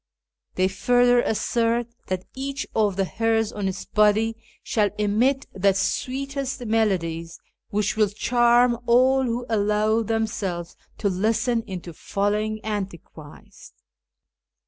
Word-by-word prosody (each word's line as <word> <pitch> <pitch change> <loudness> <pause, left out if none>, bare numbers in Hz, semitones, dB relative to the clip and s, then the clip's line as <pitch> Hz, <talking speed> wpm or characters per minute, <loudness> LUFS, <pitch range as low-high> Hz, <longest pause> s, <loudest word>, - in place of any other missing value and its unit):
They 185 0 +2
further 245 +4 +3
assert 235 +1 0 0.2
that 185 0 -3
each 275 +1 -4
of 210 -3 +1
the 195 0 +1
hairs 225 +2 0
on 205 -2 -3
its 190 0 -4
body 215 +1 +2 0.3
shall 210 -2 +1
emit 230 +7 +1
the 195 0 +2
sweetest 265 +5 -2
melodies, 170 -7 -1 0.3
which 210 +3 0
will 215 -2 +3
charm 240 +2 +3
all 260 +3 +4
who 240 0 -2
allow 215 0 +1
themselves 210 -6 -2 0.2
to 205 - -1
listen 225 +5 +1
into 180 -3 -7
following 210 +5 -2
Antichrist. 190 -7 -8
215 Hz, 115 wpm, -24 LUFS, 195-240 Hz, 0.3 s, all